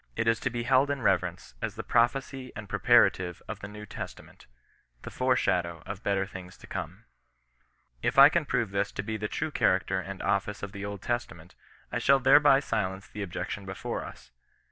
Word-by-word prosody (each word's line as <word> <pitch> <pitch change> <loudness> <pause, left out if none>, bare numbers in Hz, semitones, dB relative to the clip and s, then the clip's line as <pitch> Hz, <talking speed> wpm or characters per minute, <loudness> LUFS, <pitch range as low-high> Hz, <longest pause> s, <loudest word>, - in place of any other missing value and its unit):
It 115 0 -1
is 115 0 +3
to - - -1
be 120 0 -3
held 130 +3 +3
in 140 -3 -2
reverence 65 - 0
as - - -3
the - - -5
prophecy 130 +2 0
and 105 -1 -7
preparative 100 -5 +3
of - - -6
the 100 - -7
New 105 +1 -9
Testament - - -9 0.3
— - - -39
the - - -7
fore 130 0 +2
shadow 85 -7 0
of 100 0 -6
better 100 -2 0
things 95 -2 -10
to - - -14
come. - - -6 1.0
If - - -1
I 140 +1 +11
can 155 +1 +1
prove 115 -7 -1
this 100 +1 -1
to 100 - -3
be 110 +1 -3
the 105 0 -3
true 155 - -3
character 95 -6 +1
and 95 0 -7
office 100 +1 -1
of 100 - -4
the 100 -1 -7
Old 100 -1 -6
Testament, 90 -9 -4 0.4
I - - -1
shall 140 - +5
thereby 135 +1 +6
silence 100 -6 -3
the 105 - -7
objection 100 +2 -4
before 95 -1 -5
us. - - -12
105 Hz, 200 wpm, -28 LUFS, 95-125 Hz, 1.0 s, I